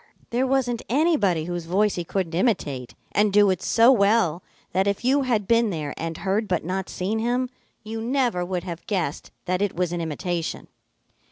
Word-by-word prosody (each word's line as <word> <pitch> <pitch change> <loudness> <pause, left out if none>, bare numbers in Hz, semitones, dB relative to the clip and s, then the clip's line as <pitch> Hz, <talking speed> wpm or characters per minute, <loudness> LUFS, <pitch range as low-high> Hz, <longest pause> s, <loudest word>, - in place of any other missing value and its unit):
There 250 +3 +1
wasn't 255 -3 0
anybody 240 - +2
whose 175 -1 -4
voice 200 +4 +2
he 175 - -3
couldn't 175 -1 -2
imitate 155 - -1 0.2
and 210 0 +3
do 205 -1 +5
it 185 -1 -2
so 230 +2 +5
well 200 -7 +3 0.3
that 190 +1 +1
if 200 +3 -1
you 275 +3 +4
had 230 -7 0
been 230 0 +3
there 155 -6 -3
and 165 0 -4
heard 200 +4 -1
but 185 - 0
not 190 +2 -3
seen 205 +5 -2
him, 245 +2 0 0.3
you 225 +1 -5
never 240 -6 0
would 180 -1 -3
have 170 -2 -7
guessed 180 -8 -2 0.2
that 185 +1 0
it 205 -2 0
was 180 0 0
an 175 - -2
imitation. 165 +1 -3
195 Hz, 185 wpm, -24 LUFS, 175-230 Hz, 0.3 s, do